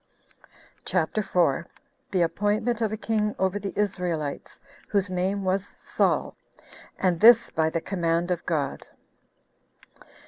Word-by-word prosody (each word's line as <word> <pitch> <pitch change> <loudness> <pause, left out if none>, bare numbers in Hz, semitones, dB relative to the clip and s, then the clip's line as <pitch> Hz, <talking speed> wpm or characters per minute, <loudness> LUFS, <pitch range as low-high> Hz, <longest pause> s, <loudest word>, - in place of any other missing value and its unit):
CHAPTER 180 +4 0
4. 170 -4 +1 0.4
The 185 -3 +2
Appointment 215 +6 0
Of 220 -2 +1
A 215 - -3
King 210 -1 -1
Over 190 +1 0
The 200 -1 -4
Israelites, 180 -8 -2 0.3
Whose 200 -2 0
Name 190 +2 -1
Was 190 +1 0
Saul; - - -1 0.6
And 180 -3 +1
This 235 +2 +7
By 160 0 +1
The 165 +1 -2
Command 170 -1 -1
Of 175 - -1
God. 150 -5 -2
185 Hz, 125 wpm, -26 LUFS, 170-210 Hz, 0.6 s, This